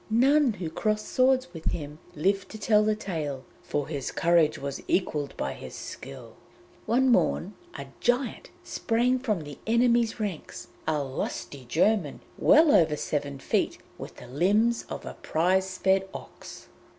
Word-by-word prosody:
None 265 +3 +4
who 175 -5 -5
crossed 215 +5 -1
swords 255 -7 +2
with 165 -2 -9
him 150 -2 -3 0.2
lived 195 +5 0
to 220 - -8
tell 210 0 +3
the 215 0 +2
tale, 155 -10 -4 0.2
for 145 -1 -3
his 140 -4 -4
courage 170 -2 +3
was 140 0 -5
equalled 150 -6 -1
by 65 - -2
his - - -9
skill. 70 - -9 0.5
One 250 +4 +3
morn 205 -4 +2 0.2
a 140 - -6
giant 250 - 0
sprang 245 +2 +1
from 215 -8 -1
the 145 -1 -10
enemy's 235 0 +3
ranks 160 - -5 0.2
a 150 -2 +1
lusty 135 0 -5
German, 175 - +1 0.2
well 305 +1 +6
over 155 -3 +4
seven 140 -2 -3
feet, 135 - 0 0.2
with - - -8
the - - -12
limbs 205 - +2
of - - -6
a - - -6
prize 185 +3 +1
fed 190 0 +2
ox. - - -10
190 Hz, 150 wpm, -27 LUFS, 150-230 Hz, 0.5 s, well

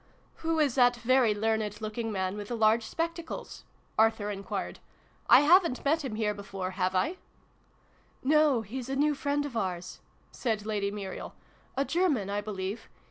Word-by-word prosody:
"Who 325 0 -1
is 295 -5 +3
that 245 -1 +5
very 240 -1 +3
learned 215 -1 -1
looking 220 +1 -3
man 190 -1 -2
with 205 -1 -6
the 240 - -3
large 220 +1 +4
spectacles? 335 0 -5
" - - -11
Arthur 220 -2 +3
enquired. 195 -1 -5 0.3
" - - -34
I - - +6
haven't 335 -3 +4
met 310 +3 +2
him 250 -6 -4
here 215 -1 0
before, 195 -2 -5
have 185 0 -1
I? 315 - +1 0.3
" - - -37
" - - -35
No, 300 -6 +4
he's 250 +4 -6
a 270 - -1
new 295 +2 +3
friend 285 +1 -1
of 275 -5 -7
ours," 180 -4 -3 0.3
said 220 -4 -2
Lady 205 -2 -1
Muriel: 200 -2 -6 0.4
"a 275 - +2
German, 295 - +1
I 205 0 -1
believe. 205 +1 -5
225 Hz, 180 wpm, -29 LUFS, 205-280 Hz, 0.4 s, I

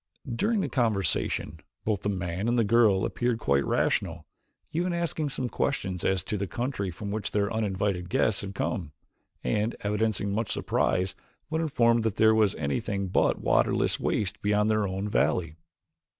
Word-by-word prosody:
During 215 - +1
the - - -1
conversation 110 - 0 0.3
both 105 -3 0
the 105 - -1
man 90 +1 -2
and 120 +1 +2
the 115 - +4
girl 105 -3 +4
appeared 120 -1 0
quite 70 -9 +2
rational, 85 -4 0 0.5
even 175 +2 0
asking 165 -3 -1
some 130 -2 -2
questions 95 -9 -2
as 95 -3 +1
to 105 - -3
the 100 0 -2
country 120 -3 -2
from 100 +4 -6
which 105 -1 -2
their 100 0 0
uninvited 100 -4 -1
guests 105 +2 +1
had 100 0 -7
come, 90 - -2 0.5
and 105 - 0
evidencing 105 -1 0
much 110 0 -1
surprise 95 +1 0 0.4
when 160 +1 0
informed 120 -7 +3
that 110 -3 -1
there 110 0 +5
was 105 -2 +3
anything 100 +6 -2
but - - +2
waterless - - +2
wastes 105 0 -1
beyond 105 +1 +2
their 110 -2 +2
own 95 +2 -3
valley. 80 -3 +1
105 Hz, 165 wpm, -28 LUFS, 95-115 Hz, 0.5 s, there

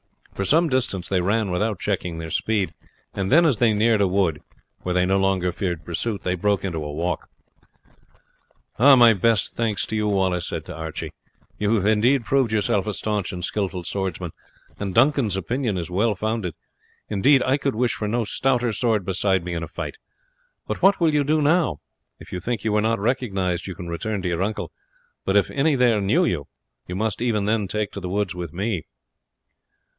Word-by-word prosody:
For 100 - -3
some 165 - +4
distance 130 -9 -1
they 95 -2 +1
ran 100 +2 0
without 105 +2 -1
checking 90 -5 -2
their 80 0 -6
speed, 105 -4 0 0.4
and 95 -1 -2
then 170 +3 +6
as 140 -8 +3
they 115 0 +4
neared 110 0 +3
a 100 - +4
wood, 90 -5 +1 0.4
where 90 0 -2
they 90 0 +3
no 95 +1 +2
longer 95 -2 +1
feared 85 -4 -3
pursuit, 100 +4 -3
they 90 - 0
broke 100 +2 0
into 85 -5 -3
a 75 - -5
walk. 85 +3 -3 1.5
"My 125 -3 +8
best 110 +1 +1
thanks 115 -3 0
to 110 - -4
you," 105 -1 0
Wallace 95 -3 +1
said 80 - -4
to 90 - -7
Archie. 80 -1 -5 0.5
"You 105 +2 +2
have 100 -3 0
indeed 115 +4 +3
proved 135 -5 +2
yourself 105 -1 +1
a 105 - -1
staunch 105 -3 -2
and 90 -2 -4
skilful 95 -3 -2
swordsman, 90 -2 -3 0.5
and 100 -2 -4
Duncan's 120 -6 +3
opinion 115 - -1
is 85 0 -4
well 105 +4 +1
founded. 110 -4 -2 0.5
Indeed 130 +7 +4
I 130 +2 +2
could 140 -4 -1
wish 120 0 +1
for 105 - -3
no 115 +3 0
stouter 125 +1 0
sword 110 -5 0
beside 95 -1 +1
me 90 - -3
in 85 - -3
a 80 - -4
fight; 90 - -6 0.7
but - - -4
what 195 +1 +5
will 165 -3 +3
you 145 -1 +3
do 150 +2 +1
now? 155 - +2 0.4
If - - -13
you 90 - -2
think 115 +3 -3
that - - -13
you 110 - +1
were 105 0 +2
not 115 +1 +1
recognized 100 -6 -1
you 95 - -6
can 85 - -8
return 95 +4 -3
to - - -1
your 85 0 -1
uncle; 105 +2 -2 0.5
but 95 - +1
if 100 - +2
any 145 +2 +2
there 120 -5 +3
knew 150 - +3
you, 75 - -2 0.4
you 90 - -5
must 110 +1 -2
even 110 -4 +1
then 105 -1 +1
take 105 +1 -2
to - - -6
the 90 -2 -5
woods 100 -1 -1
with 90 -3 -6
me." 95 -1 -2
105 Hz, 200 wpm, -23 LUFS, 90-115 Hz, 1.5 s, My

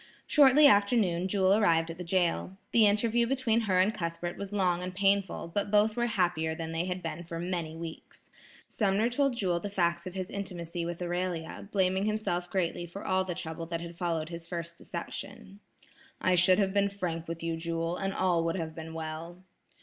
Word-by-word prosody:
Shortly 290 0 +6
after 205 -3 +5
noon, 180 -4 +1
Jewel 190 0 +3
arrived 165 -6 +3
at 165 - -10
the - - -4
jail. 180 +1 0
The 220 -3 +6
interview 230 +3 +2
between 245 -3 +1
her 185 -1 +4
and 200 +4 +3
Cuthbert 170 -1 -4
was 200 0 -6
long 180 -4 +1
and 180 0 -5
painful, 195 -3 +1
but 205 0 0
both 210 +1 +3
were 240 0 +1
happier 175 -6 0
than 165 -1 -5
they 165 +2 -1
had 180 0 -4
been 165 +1 -4
for 165 0 -6
many 170 -2 -3
weeks. 165 0 -9 0.4
Sumner 210 +2 +1
told 275 +1 +1
Jewel 180 -6 0
the 205 - -5
facts 175 -2 0
of 185 - -7
his 190 +2 -4
intimacy 175 -3 -4
with 175 +1 -4
Amelia, 175 +1 -3
blaming 190 0 +2
himself 180 -5 -1
greatly 175 -2 -1
for 195 +4 -9
all 190 0 +2
the 180 -2 -4
trouble 165 -1 -5
that 165 0 -3
had 170 0 -8
followed 165 -2 -2
his 170 -1 -7
first 170 -1 -5
deception. 185 +3 -7 0.6
"I 185 - +2
should 180 +1 +5
have 195 -2 +1
been 200 0 +3
frank 175 -4 -4
with 165 0 -5
you, 165 0 -1
Jewel, 165 +1 -2
and 195 +1 -2
all 180 -3 +1
would 165 - 0
have 160 -3 -4
been 160 0 -8
well." 165 +3 -6
180 Hz, 200 wpm, -30 LUFS, 170-200 Hz, 0.6 s, Shortly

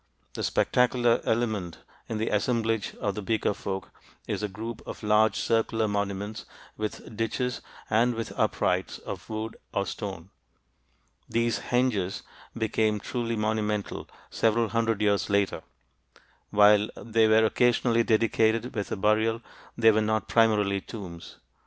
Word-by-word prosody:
The - - -5
spectacular 120 -1 +2
element 110 -8 -1 0.3
in 110 - -2
the 110 +1 -1
assemblage 115 0 0
of 100 - -2
the 105 - -5
Beaker 110 0 0
folk 95 -1 -5 0.4
is - - -2
a 105 - -1
group 110 +3 -7
of - - -7
large 105 +1 +4
circular 115 -1 +1
monuments 100 +1 -3 0.3
with 110 +1 -5
ditches 125 +3 -2 0.3
and 115 +3 +2
with 115 -1 -4
uprights - - 0
of - - -8
wood 110 0 -4
or 100 - 0
stone. 95 -4 -6 1.0
These 115 0 +1
"henges" 120 -7 0 0.3
became 110 -1 +1
truly 115 +1 -3
monumental 105 -1 -2 0.2
several 115 0 +2
hundred 115 -2 0
years 100 -1 +2
later; 100 -1 +1 0.9
while 105 0 +5
they 115 -1 +2
were 110 0 +5
occasionally 120 +1 +3
dedicated 115 +1 +2
with 105 -2 -3
a - - 0
burial, 110 +3 +2 0.3
they 115 -1 +6
were 110 0 +2
not 110 0 0
primarily 105 -1 +3
tombs. 90 -7 -9
110 Hz, 135 wpm, -27 LUFS, 105-115 Hz, 1.0 s, they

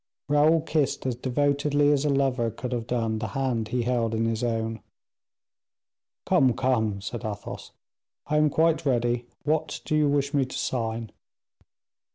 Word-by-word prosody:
Raoul 150 +3 +4
kissed 155 -4 -1
as 130 - 0
devotedly 145 +3 +1
as 145 0 +1
a - - +2
lover 135 -4 +1
could 125 +3 -6
have 120 -2 -3
done 115 -3 -1
the 110 - -3
hand 125 -5 0
he 120 +1 -1
held 115 -2 0
in 115 +1 0
his 115 +1 -1
own. 115 -2 -2 1.4
"Come, 130 -2 +4
come," 110 -6 0
said 115 +4 -5
Athos, 105 -2 -6 0.5
"I 150 - 0
am 150 0 +4
quite 160 +2 +2
ready; 120 -2 0 0.2
what 155 +1 -1
do 155 - 0
you 150 -1 +3
wish 140 0 0
me 140 -2 +3
to 130 - -5
sign?" 115 -2 -2
125 Hz, 160 wpm, -26 LUFS, 115-145 Hz, 1.4 s, Raoul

